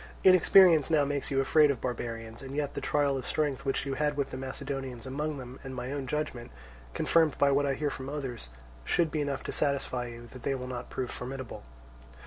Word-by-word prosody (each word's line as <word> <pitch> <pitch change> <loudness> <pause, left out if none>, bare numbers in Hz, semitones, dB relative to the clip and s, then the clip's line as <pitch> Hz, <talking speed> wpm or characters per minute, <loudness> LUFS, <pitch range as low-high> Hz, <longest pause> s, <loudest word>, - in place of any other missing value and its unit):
Inexperience 185 -4 +7
now 155 -3 +4
makes 140 -1 -2
you 135 - +1
afraid 150 +2 +5
of 135 -4 0
barbarians; 115 -2 -5
and 135 0 -7
yet 145 -1 -1
the - - -4
trial 145 -2 +1
of 130 - -8
strength 145 -3 -1
which 135 0 0
you 135 - -2
had 150 +1 0
with 140 -1 -1
the - - -5
Macedonians 130 -2 -5
among 150 +3 -3
them, 130 0 -9
and 135 -1 -6
my 125 +1 -4
own 140 -2 -3
judgment, 150 - -3 0.5
confirmed 160 -3 +3
by 140 0 +4
what 140 +1 +2
I 135 - +1
hear 150 0 -1
from 135 0 -6
others, 130 - -5 0.3
should 160 - +1
be 155 - 0
enough 140 -2 -2
to - - -4
satisfy 135 -4 -1
you 120 0 -9
that 130 - -10
they 135 +2 0
will 125 -1 -5
not 125 -1 -6
prove 125 -2 -3
formidable. 130 -1 -6
135 Hz, 215 wpm, -30 LUFS, 130-145 Hz, 0.5 s, Inexperience